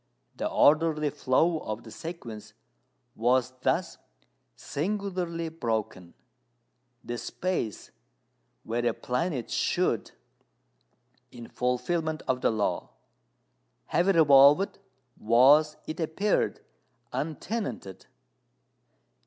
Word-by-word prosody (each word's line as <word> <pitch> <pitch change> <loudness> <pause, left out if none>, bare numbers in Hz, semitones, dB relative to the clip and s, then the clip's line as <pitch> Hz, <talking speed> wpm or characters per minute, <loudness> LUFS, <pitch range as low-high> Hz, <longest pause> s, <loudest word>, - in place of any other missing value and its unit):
The - - -2
orderly 150 0 +3
flow 150 +4 +1
of 110 -3 -6
the 110 - -12
sequence 120 -5 -8 0.6
was 125 +2 +2
thus - - 0 0.6
singularly 180 -1 -3
broken. 110 - -4 0.9
The 120 0 -5
space 175 - -3 0.7
where 120 +2 -2
a 120 -2 +1
planet 125 0 -2
should - - 0 1.2
in 120 -2 -10
fulfilment 155 +6 -1
of 130 -1 0
the - - +3
"Law" 110 -2 -1 1.0
have 175 - +3
revolved, 150 0 +6 0.4
was, 140 +7 +5
it 155 +3 -6
appeared, 170 +6 0 0.5
untenanted. 155 - -4
145 Hz, 85 wpm, -28 LUFS, 120-165 Hz, 1.2 s, revolved